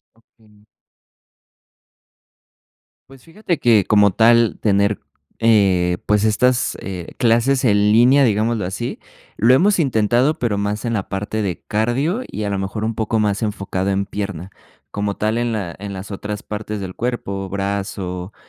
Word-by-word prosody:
Okey. 110 -2 -26 2.5
Pues 135 -2 -16
fíjate 170 0 -3
que, 110 -5 +4
como 105 -2 +4
tal, 115 +2 +3
tener, 100 0 +1 0.4
eh, 95 -6 +3
pues, 105 0 +2
estas, 125 +3 +2
eh, 90 -3 -7
clases 125 +3 +2
en 105 -4 +4
línea, 125 +6 +5
digámoslo 110 -3 +1
así, 110 +6 -4 0.4
lo 120 +4 +5
hemos 195 +7 +3
intentado, 125 +1 +2
pero 110 -5 -1
más 105 +3 -2
en 115 - -1
la 100 -4 -2
parte 105 +2 -3
de 95 -4 -3
cardio 120 - 0
y, 105 - -5
a 100 - -2
lo 100 - -1
mejor, 95 +3 -3
un 115 - -2
poco 110 0 -1
más 105 -1 0
enfocado 100 -2 -2
en 100 0 0
pierna. 100 -3 -5 0.4
Como 100 -1 -3
tal, 110 +2 0
en 120 -1 -1
la 100 -6 -4
en 100 0 -6
las 95 +2 -8
otras 100 +1 -5
partes 105 0 -5
del 95 -1 -6
cuerpo, 100 -5 -3
brazo 95 -1 -4
105 Hz, 155 wpm, -19 LUFS, 100-115 Hz, 2.5 s, línea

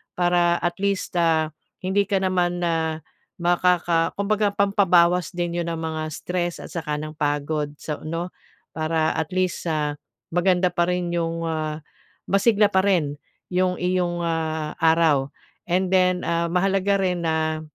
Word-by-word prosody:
para 175 -1 +3
at 175 0 -1
least, 200 -2 -1
ah, 160 -2 +2 0.3
hindi 200 +2 +2
ka 195 -1 0
naman 175 -2 0
na 160 -2 -1 0.4
makaka 175 -1 +2
kumbaga 205 0 +1
pampabawas 180 -4 +3
din 175 -1 -2
'yon 170 - -1
ng 165 - -4
mga 160 -1 -3
stress 175 +1 -3
at - - -9
saka 160 -3 -3
ng 155 0 -7
pagod 145 0 -1
so 150 -2 -4
'no? 165 +3 -3 0.5
Para 160 0 0
at 160 +1 -2
least, 185 -1 -1
ah, 150 -2 -1 0.4
maganda 180 +1 +2
pa 175 -1 +1
rin 180 -1 -1
'yong 165 -1 -1
ah, 155 -1 -3 0.5
masigla 205 +1 +4
pa 190 0 +3
rin 155 -7 +1 0.3
'yong 180 0 +1
iyong, 180 -1 0
ah, 160 -2 -2
araw. 160 -4 +3 0.4
And 185 +1 +1
then, 185 -1 +3
ah, 170 0 0
mahalaga 195 +2 +2
rin 180 -2 -1
na 160 0 0
175 Hz, 150 wpm, -23 LUFS, 160-185 Hz, 0.5 s, masigla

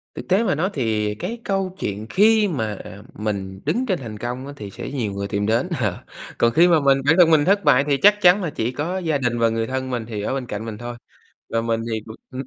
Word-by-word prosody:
Thực - - -8
tế 190 +5 +3
mà 185 -8 +1
nói 180 +6 0
thì 110 -5 -1
cái 230 - -5
câu 195 -2 -2
chuyện 105 +2 -4
khi 215 +1 +4
mà 110 - -2 0.4
mình 100 -3 -4
đứng 215 - 0
trên 185 - -1
thành 110 -4 -7
công 125 +4 -5
á, 140 - -7
thì 105 -7 -8
sẽ - - -7
nhiều 115 -8 -2
người 100 0 -4
tìm 100 0 -1
đến. 115 - +1
Ờ, 105 +1 -2 0.3
còn 115 - +3
khi 170 +4 +6
mà 165 -3 +4
mình 140 -1 +4
bản 160 - +5
thân 170 -2 +6
mình 150 -2 +5
thất 200 +2 +3
bại 135 -4 +5
thì 140 -1 +2
chắc 205 +4 +5
chắn 185 +2 +5
là 165 - -1
chỉ 115 -3 -2
có 160 +8 -3
gia 160 -5 0
đình 120 -3 -1
và 115 0 +3
người 115 0 -1
thân 130 0 -3
mình 120 -3 -3
thì 110 -3 -4
ở 105 - -2
bên 135 -2 -3
cạnh 105 +1 -5
mình 110 -2 -6
thôi. 120 +2 -6 0.5
Và 115 0 0
mình 115 0 -1
thì, 110 - -1 0.3
ừm 130 +1 -5
130 Hz, 260 wpm, -22 LUFS, 110-175 Hz, 0.5 s, khi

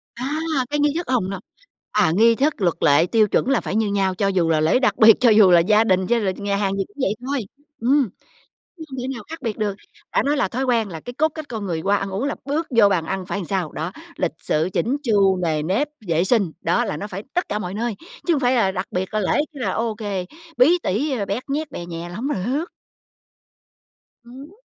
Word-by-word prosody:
À, 245 - -5 0.4
cái 295 - -1
nghi 290 0 +2
thức 345 - -4
hông, 240 -8 +1
no, 195 -1 -4 0.5
à, - - +3
nghi 230 +2 +5
thức 280 -1 0
luật 175 -3 +2
lệ, 145 +3 +5
tiêu 215 +3 +3
chuẩn 250 - +1
là 275 -4 +2
phải - - -4
như 220 -1 +2
nhau. 195 -2 0
Cho 200 +1 0
dù 180 -4 +1
là 160 -1 +3
lễ 160 +11 +3
đặc 260 - +1
biệt, 220 0 +8
cho 245 - +5
dù 210 -4 +6
là 175 - +7
gia 210 +6 +4
đình, 190 -4 +1
cho 240 - +2
là 205 -4 0
nhà 200 -1 -2
hàng 200 -1 0
gì 195 - +1
cũng 205 - -28
vậy 210 -4 +1
thôi, 270 -4 -2 0.4
ừm, 260 0 +3 0.7
chứ 320 - -8
không 265 -1 -8
thể 255 - -4
nào 235 - -8
khác 325 -3 -8
biệt 225 -4 -3
được. 210 -2 -1 0.4
Đã - - +3
nói 290 +2 +1
là 195 - +1
thói 255 +7 -2
quen 235 -4 +1
là 165 -4 -7
cái 245 - -8
cốt 305 +5 +2
cách 315 - -6
con 220 -3 -5
người 165 -3 -2
qua 200 +3 +2
ăn 195 0 -3
uống 195 +7 -2
là 285 - -1
bước 300 +4 -1
vô 210 -3 +7
bàn 180 -5 0
ăn 190 +2 -4
phải 200 - -3
sao? 185 -5 -2
Đó, 160 +4 -4 0.2
lịch 180 - -1
sự, 155 +3 0
chỉnh 245 +8 0
chu, 200 -6 +3
nề 155 -3 0
nếp, 200 - 0 0.2
vệ 165 +1 +1
sinh, 195 -5 +2
đó 240 - +1
là 205 - -3
nó 205 - -5
phải 195 0 -6
tất 355 - 0
cả 210 - -1
mọi 185 -2 -5
nơi, 230 +1 -2 0.3
chứ 345 - +3
hông 290 - 0
phải 250 -1 +2
là 210 -6 +2
đặc 185 0 -3
biệt 185 +3 -3
là 215 - +1
lễ 190 - 0 0.2
cái 280 - -10
là - - 0
ô 230 -1 -1
kê, 200 -4 -4 0.3
bí 300 +9 +5
tỉ, 230 +11 0
à, 240 -7 -1
bét 200 +5 -3
nhét 295 +1 -2
bè 175 - -7
nhè 170 0 -6
là 175 - -9
hông 250 +6 -3
được. 270 - -1 1.6
Ừm. 265 +6 -12
210 Hz, 255 wpm, -22 LUFS, 190-255 Hz, 1.6 s, biệt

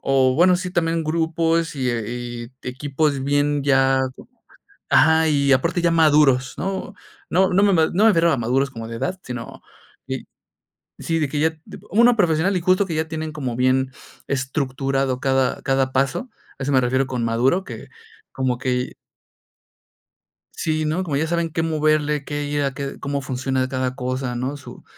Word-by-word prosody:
O 130 -1 +2
bueno, 180 +3 +5
sí, 180 0 -4
también 165 -2 0
grupos 165 0 0
y, 130 -2 -1
eh, 115 -2 -2
y 120 0 -6 0.2
equipos 140 +2 -1
bien 145 0 +1
ya 135 -1 +3 0.9
ajá, 160 0 +4
y 140 -2 +2
aparte 170 +6 +1
ya 170 - +3
maduros, 150 -5 +4
¿no? 190 +1 -4 0.4
No 185 +2 +3
no 195 +2 +3
me 200 - +4
me 160 -2 +4
no 200 +5 +3
me 225 - +7
refiero 170 -2 +3
a - - +1
maduros 130 +4 0
como 115 -3 -7
de 115 - -6
edad, 185 +9 -3
sino, 125 -2 -8 0.4
id - - -4 0.7
si, 165 -1 -1
de 150 - +1
que 145 - -2
ya, 160 +1 +1
tipo - - -12
una 235 +3 +5
profesional 175 -1 +2
y - - -2
justo 185 +3 +3
que 165 -4 -4
ya 160 0 -1
tienen 160 -1 -4
como 130 -6 -4
bien 130 +1 +1 0.4
estructurado 135 -1 -1
cada 130 -1 +1
cada 135 -1 +1
paso, 135 - -1 0.3
a 135 - -5
eso 140 - -1
me 130 -1 +4
refiero 130 +2 +1
con 125 -3 -3
maduro, 125 +11 +1
que - - -9 0.4
como 130 -2 -1
que. 125 -1 -1 1.6
Sí, 155 -1 -1
¿no? 160 +5 -1
Como 150 -6 -2
ya 160 +3 0
saben 170 0 -1
qué 165 - -1
moverle, 155 -2 +1
qué 145 0 -3
ir 145 0 -1
a, 135 -1 -1
qué 140 0 -6
cómo 140 0 -3
funciona 130 0 -2
cada 130 -1 -2
cosa, 130 -1 -3
¿no? 130 +4 -3
Su 140 - -12
140 Hz, 180 wpm, -22 LUFS, 130-160 Hz, 1.6 s, me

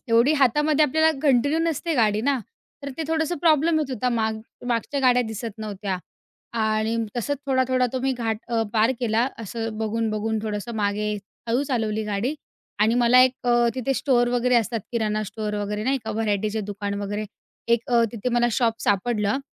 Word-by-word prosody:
एवढी 235 +5 +4
हातामध्ये 295 +2 +3
आपल्याला 315 +3 +3
कंटिन्यू 285 +2 +3
नसते 330 0 -1
गाडी 215 -4 +2
ना? 275 +3 +1 0.4
तर 280 - -5
ते 325 - -2
थोडंसं 320 +1 0
प्रॉब्लेम 315 0 +3
येत 290 -3 -3
होता 255 0 -1
माग 220 -2 -1 0.3
मागच्या 245 +4 -1
गाड्या 250 -1 +4
दिसत 220 0 -5
नव्हत्या 205 -3 -3 0.7
आणि 220 +1 +1 0.2
तसंच 280 +4 -1
थोडा-थोडा 260 -1 +2
तो 260 - -2
मी 265 +1 +1
घाट 230 -3 -2
अ, 230 -1 +1
पार 225 +3 +3
केला. 230 0 +2
असं 225 0 -5
बघून-बघून 220 0 -1
थोडंसं 215 +2 -4
मागे, 210 0 0 0.4
हळू 240 +4 +2
चालवली 220 -6 -1
गाडी 210 +7 -1 0.4
आणि 215 +2 +3
मला 245 +1 +5
एक 255 0 +4
अ, 240 -1 +4
तिथे 260 +1 -1
स्टोअर 245 -3 +2
वगैरे 245 +1 +1
असतात 230 0 0
किराणा 215 -2 0
स्टोअर 210 +1 -4
वगैरे 210 +1 -3
नाही 270 +2 +1
का? 220 - -3
व्हरायटीचे 215 0 -1
दुकान 200 0 -4
वगैरे. 205 +1 -3 0.4
एक 235 0 +4
अ, 235 -1 +5
तिथे 230 +1 -3
मला 240 0 +3
शॉप 230 -1 0
सापडलं. 210 +2 +1
235 Hz, 170 wpm, -24 LUFS, 215-260 Hz, 0.7 s, मला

